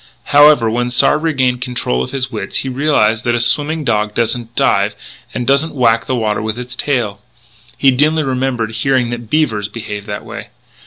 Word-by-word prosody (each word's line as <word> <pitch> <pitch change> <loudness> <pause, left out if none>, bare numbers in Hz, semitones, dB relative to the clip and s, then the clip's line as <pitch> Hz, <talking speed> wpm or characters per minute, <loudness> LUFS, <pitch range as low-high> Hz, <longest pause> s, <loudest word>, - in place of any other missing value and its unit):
However, 145 -5 +6
when 120 +2 -1
Sard 130 +5 +3
regained 130 -6 0
control 125 - -2
of 65 - -4
his 130 -1 -3
wits 105 -4 -5
he - - -2
realised 125 -5 +1
that 120 -1 +1
a - - 0
swimming 150 +6 +1
dog 105 -4 -1
doesn't 115 0 -2
dive - - +2 0.4
and 125 - -4
doesn't 140 +5 +1
whack 115 -3 +2
the 130 - 0
water 110 -3 -1
with 110 +1 -3
its 125 0 -6
tail. 115 -8 -2 0.6
He 135 - +4
dimly 150 +4 +2
remembered 130 -4 -1
hearing 120 +2 0
that 120 -2 -6
beavers 115 -10 0
behaved 105 -2 -7
that 105 0 -6
way. - - -8
125 Hz, 180 wpm, -16 LUFS, 110-135 Hz, 0.6 s, However